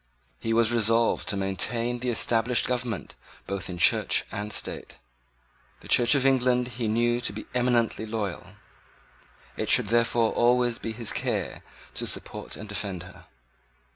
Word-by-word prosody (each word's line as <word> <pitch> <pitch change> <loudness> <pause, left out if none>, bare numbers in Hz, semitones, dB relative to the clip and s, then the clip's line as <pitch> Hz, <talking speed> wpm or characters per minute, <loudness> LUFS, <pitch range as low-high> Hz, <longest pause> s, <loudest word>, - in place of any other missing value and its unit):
He 115 - -3
was 115 0 +3
resolved 115 0 +2
to 100 - 0
maintain 115 +5 -1
the 125 +1 -2
established 115 +1 +2
government 125 -4 -3 0.3
both 100 -2 -4
in 90 - -5
Church - - +3
and 105 +1 -4
State. - - -5 0.8
The - - -13
Church 120 +2 +5
of 135 -1 +1
England 125 -2 +2
he 115 -1 -3
knew 120 +2 +1
to 120 - 0
be 105 +2 -7
eminently 120 -3 +1
loyal. 105 -4 -4 1.0
It - - -2
should 100 - +4
therefore 115 0 +2
always 120 0 +2
be 115 - -4
his 115 0 -3
care - - -2 0.3
to - - -3
support - - -2
and 105 - -8
defend 100 -4 -4
her. 90 0 -14
115 Hz, 150 wpm, -26 LUFS, 105-120 Hz, 1.0 s, Church